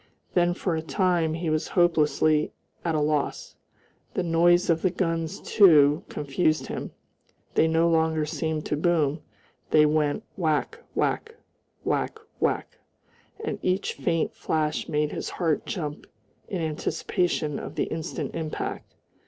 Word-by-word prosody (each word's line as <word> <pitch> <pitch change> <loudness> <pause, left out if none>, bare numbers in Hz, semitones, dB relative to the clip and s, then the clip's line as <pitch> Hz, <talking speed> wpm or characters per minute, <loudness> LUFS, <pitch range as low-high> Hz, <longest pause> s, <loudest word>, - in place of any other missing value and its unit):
Then 175 -1 +3
for 180 -2 -1
a 160 - -1
time 165 +1 +1
he 165 -1 -2
was 155 +1 0
hopelessly 155 -2 +3 0.3
at 165 -2 0
a - - +2
loss. 150 -1 -1 0.6
The 185 - +1
noise 175 +2 +4
of 165 -1 +2
the 185 - +3
guns, 165 -3 -2
too, 150 -8 +5
confused 155 +2 0
him, - - -5 0.6
they 160 - +4
no 165 +1 +3
longer 160 -2 +2
seemed 155 0 -2
to - - 0
boom; 155 -2 +1 0.5
they 150 -1 +6
went 150 +5 +1
whack, 170 - 0 0.2
whack, 455 0 -1 0.5
whack, - - -1 0.2
whack, - - -1 0.6
and 445 - -3
each 185 +2 0
faint 165 -3 -1
flash 155 -1 -1
made 150 0 0
his - - -4
heart 165 -4 -1
jump 150 -6 -4 0.4
in 180 -4 -3
anticipation 155 0 -1
of - - -7
the - - +1
instant 155 -3 -4
impact. 160 -2 -4
160 Hz, 135 wpm, -26 LUFS, 150-175 Hz, 0.6 s, they